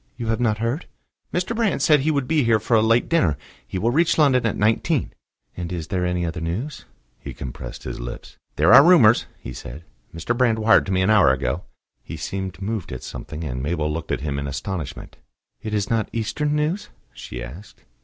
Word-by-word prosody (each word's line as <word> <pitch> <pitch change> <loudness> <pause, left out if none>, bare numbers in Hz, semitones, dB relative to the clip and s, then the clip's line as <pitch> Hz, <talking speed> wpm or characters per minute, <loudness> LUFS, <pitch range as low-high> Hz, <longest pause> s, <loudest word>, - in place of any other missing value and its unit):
You 115 -2 -4
have 115 - 0
not 110 -3 +1
heard?" 115 +9 -2 0.4
"Mr. 180 +6 -1
Brand 220 -4 +1
said 150 -2 +5
he 145 +4 0
would 140 -4 0
be 155 -3 +2
here 115 -2 +3
for 110 +3 -2
a 110 - +5
late 115 +2 +3
dinner. 95 - +2 0.3
He 95 - -4
will 115 +6 +1
reach 165 +5 +2
London 130 -6 +4
at 110 - -2
nineteen." 110 +2 +1 0.4
"And 90 0 -5
is 85 -3 -5
there 90 -2 0
any 90 -1 -1
other 85 0 -4
news?" 100 - -4 0.3
He - - -8
compressed 60 -1 -7
his - - -6
lips. - - -8 0.2
"There 80 +9 +5
are 135 +2 +10
rumours," 145 -10 +6
he - - -8
said. 65 +7 -9 0.3
"Mr. 85 +9 -2
Brand 120 -3 +2
wired 110 -1 +4
to - - -2
me 95 0 +2
an 100 - +3
hour 95 -11 +6
ago." 65 -1 -2 0.4
He - - -8
seemed 95 -1 -5
moved 100 -2 -4
at - - -6
something, 80 +1 -7
and 65 -4 -4
Mabel 75 +1 -1
looked 80 0 -5
at - - -1
him 70 -1 -2
in 70 - -4
astonishment. 80 +3 -5 0.4
"It 110 - -5
is 105 -2 0
not 115 -2 0
Eastern 145 +7 -1
news?" 155 +7 -1 0.2
she - - -8
asked. 80 +13 -11
105 Hz, 210 wpm, -22 LUFS, 80-125 Hz, 0.4 s, are